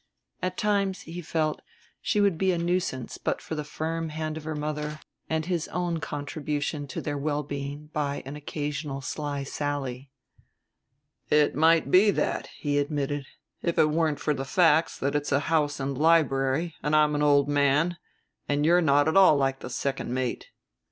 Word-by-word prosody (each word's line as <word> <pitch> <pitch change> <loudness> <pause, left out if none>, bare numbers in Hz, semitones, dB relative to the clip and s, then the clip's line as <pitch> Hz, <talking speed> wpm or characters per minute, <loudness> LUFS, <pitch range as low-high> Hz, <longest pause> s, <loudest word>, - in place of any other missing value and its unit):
At 185 0 -2
times, 200 -3 +1
he 170 +2 -7
felt, 155 -1 -1 0.4
she 210 - 0
would 200 -3 +3
be 190 -1 +3
a 175 - 0
nuisance 170 -7 -2
but - - -1
for - - -7
the 150 -1 -2
firm 160 +2 -3
hand 155 0 -4
of 160 -1 -7
her 160 -1 -3
mother 150 0 -3 0.3
and 160 -1 0
his 175 -2 -1
own 175 -2 -2
contribution 145 0 -3
to - - -5
their 145 -1 -3
well 150 +1 -1
being 145 +1 -6
by 145 -2 -2
an 135 +2 -6
occasional 145 -1 -4
sly 145 +1 -3
sally. 140 -2 -4 1.2
"It 150 -1 +4
might 160 -2 +3
be 195 +3 +6
that," - - 0
he 145 -1 -2
admitted; 145 -1 -2 0.3
"if 170 - -1
it 155 - +4
weren't 155 -2 +1
for 150 - 0
the 135 - -3
facts 165 +1 +3
that 140 +1 -1
it's 145 0 -1
a 140 - +3
house 150 -2 +1
and 135 0 -2
library, 150 0 +2
and 150 +1 +1
I'm 150 -1 +4
an 145 - 0
old 145 -1 +4
man, 145 +4 +2 0.5
and 145 +1 +1
you're 175 +2 +5
not 145 -2 +4
at 160 - +1
all 190 -6 +7
like 135 -1 0
the - - -7
second 135 0 -3
mate." 130 -1 -2
150 Hz, 180 wpm, -27 LUFS, 145-165 Hz, 1.2 s, all